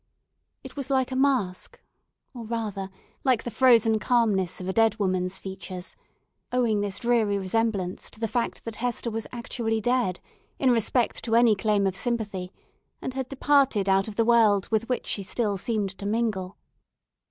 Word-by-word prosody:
It - - -10
was 280 -2 -5
like 265 -1 +1
a - - -2
mask; 255 -9 0 0.5
or, 240 -3 -7
rather 215 -4 -4 0.3
like 255 -4 +2
the 240 - -5
frozen 225 -2 +4
calmness 205 -6 +1
of 185 - -6
a 190 - -1
dead 225 0 +3
woman's 185 -2 -1
features; 190 -1 -7 0.6
owing 235 -4 +1
this 200 -2 -2
dreary 230 -4 +2
resemblance 195 -1 -1
to - - -14
the 225 - 0
fact 235 +2 -2
that 230 -2 -6
Hester 240 -1 -2
was 225 0 -4
actually 235 -2 -2
dead, 240 -5 0 0.4
in 260 -2 +3
respect 235 +1 +1
to 225 -1 +1
any 235 -1 +6
claim 205 -1 +1
of 190 -1 0
sympathy, 200 -5 -3 0.5
and 260 - -5
had 265 -1 -4
departed 275 -7 +2
out 195 +1 +3
of 215 - -7
the 230 - +2
world 220 -5 +4
with 220 +2 0
which 250 - -1
she 200 - -2
still 205 +2 -1
seemed 205 0 -2
to 200 - -4
mingle. 210 -4 -1
220 Hz, 170 wpm, -26 LUFS, 195-240 Hz, 0.6 s, any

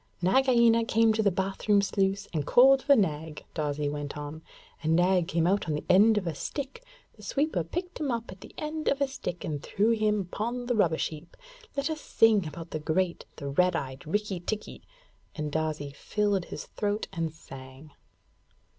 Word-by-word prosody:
'Nagaina 235 +3 +4
came 225 -1 +3
to 220 - +1
the 205 - +4
bath 190 +3 -3
room 205 -1 +6
sluice 195 0 0
and 150 -3 -2
called 265 +2 +6
for 280 0 +5
Nag,' 160 - -1
Darzee 150 -1 -1
went 145 0 -4
on; 150 +2 -7 0.4
'and 160 +1 +2
Nag 180 0 +3
came 165 0 +1
out 195 +2 +1
on 155 - 0
the 150 - -4
end 210 +4 +6
of 200 - -1
a 165 - -2
stick 280 - -6 0.3
the - - -16
sweeper 280 - 0
picked 355 - -5
him 300 -3 -1
up 230 -3 -3
on 185 - -10
the - - -11
end 310 0 -4
of 280 - +2
a 280 - +2
stick 200 -9 -5
and 150 -4 -3
threw 210 +8 +1
him 215 -2 +2
upon 235 +7 -4
the 245 - 0
rubbish 175 -8 +2
heap. 160 +2 -12 0.4
Let 280 +1 0
us 310 -1 -4
sing 215 -6 +3
about 165 +2 -8
the 155 - -3
great, 170 +4 -1
the 140 -2 -5
red 180 +5 +2
eyed 135 -1 -5
Rikki 205 +1 -1
tikki!' 210 +5 -5 0.5
and 150 -2 -3
Darzee 155 -2 -2
filled 205 +4 -1
his - - -7
throat 205 0 -2
and 165 -3 -2
sang. 135 -1 -12
190 Hz, 190 wpm, -28 LUFS, 155-225 Hz, 0.5 s, room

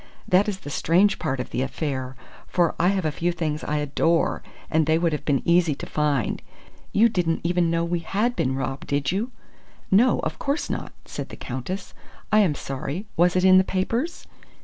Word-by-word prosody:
That 195 +3 +4
is 195 -2 -5
the 145 - -7
strange 190 +7 +3
part 135 0 -2
of 125 - -5
the 125 - -1
affair, 130 -2 -3 0.3
for 175 -2 +2
I 175 - +3
have 190 -2 +1
a 155 - +1
few 170 +4 -1
things 160 -3 -3
I 150 - -1
adore 150 +3 +1 0.3
and 160 -1 +1
they 160 0 +4
would 165 -1 +1
have 150 - -3
been 140 -3 +1
easy 170 -3 +4
to - - -7
find. 145 -6 0 0.5
You 225 +3 +5
didn't 175 -7 0
even 175 0 +2
know 170 0 +1
we 170 0 -1
had 210 +8 -1
been 130 +1 0
robbed, 135 0 -4
did 140 0 0
you?" 210 +7 -1 0.6
"No, 235 +6 +5
of - - -4
course 280 +3 -1
not," - - -4
said - - -6
the - - -9
Countess. 140 +10 -5 0.4
"I 215 - +6
am 180 -8 +3
sorry! 140 +8 -5
Was 175 +1 +3
it 185 0 +3
in 185 0 +8
the - - +4
papers?" 230 - -2
170 Hz, 200 wpm, -24 LUFS, 145-190 Hz, 0.6 s, in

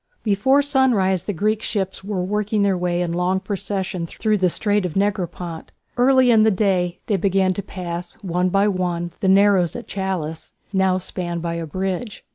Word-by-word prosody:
Before 240 +7 +3
sunrise 245 - +2
the - - -1
Greek 210 +4 0
ships 190 -4 -3
were 195 -2 -2
working 210 +2 0
their 195 -1 +2
way 175 0 0
in 170 - -2
long 180 +2 0
procession 190 -3 -3
through 215 +3 0
the 185 -1 +3
Strait 205 +3 +1
of 180 -4 -4
Negropont. 180 -4 -2 0.2
Early 255 0 +4
in 220 -2 +5
the 220 - +5
day 185 -3 +1
they 205 - +1
began 190 0 +2
to 200 - -4
pass 175 -2 -6
one 180 0 0
by 195 +2 +3
one 175 -3 -1
the 190 - +1
narrows 195 -3 +4
at 240 - -7
Chalcis, 185 -5 -4 0.2
now 190 -1 +2
spanned 175 -2 -4
by 170 -1 -2
a 165 -1 -4
bridge. 190 +6 -4
190 Hz, 180 wpm, -21 LUFS, 180-205 Hz, 0.2 s, in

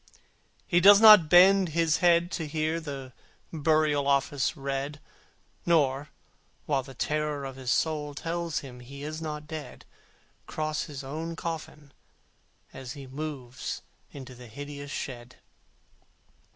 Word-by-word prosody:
He 175 - +3
does 200 +3 +8
not 210 -7 +9
bend 185 +1 +6
his 165 -1 +3
head 175 0 +3
to 160 -3 -3
hear 155 +2 -1
The 135 -5 -7 0.4
Burial 155 -2 +2
Office 140 +2 +1
read, 140 +1 -4 0.6
Nor, 145 -4 +1 0.6
while 140 -3 +1
the 135 0 -13
anguish 150 -2 -1
of 135 - -9
his 130 -2 -6
soul 150 0 0
Tells 170 +1 -3
him 125 -3 -11
he 140 +3 -10
is 155 +2 -5
not 150 -1 -5
dead, 155 -4 -8 0.6
Cross 155 0 -2
his 140 -2 -8
own 160 +5 -5
coffin, 155 -3 -6 0.8
as 130 -1 -8
he 140 -1 -10
moves 130 -2 -6 0.3
Into 135 -2 -10
the 125 0 -12
hideous 145 +4 -8
shed. 125 -3 -6
150 Hz, 130 wpm, -28 LUFS, 135-160 Hz, 0.8 s, not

